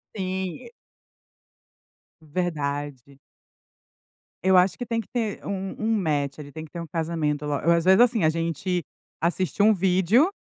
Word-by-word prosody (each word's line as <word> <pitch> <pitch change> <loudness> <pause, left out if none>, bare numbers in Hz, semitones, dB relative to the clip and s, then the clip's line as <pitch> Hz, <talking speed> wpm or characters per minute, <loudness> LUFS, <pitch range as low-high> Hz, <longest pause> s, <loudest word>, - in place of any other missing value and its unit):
Sim, 185 -2 -3
e 235 - -16 1.5
Verdade. 145 -5 -4 1.3
Eu 190 -1 +6
acho 180 0 +4
que 245 - -4
tem 230 -1 -1
que 225 - -6
ter 225 -4 -2
um 195 -1 -3
um 220 0 +1
match, 145 -6 0 0.2
tem 160 0 -7
que 150 - -18
ter 170 - -6
um - - -5
casamento 155 -2 -2
lo 150 - -1
ou 160 +4 +1
às 170 0 +2
vezes, 190 +4 +6
assim, 235 -8 +4
a - - +5
gente 165 +2 -1 0.4
assiste 180 +3 0
um 220 +1 +6
vídeo, 190 - +3
175 Hz, 155 wpm, -25 LUFS, 155-195 Hz, 1.5 s, Eu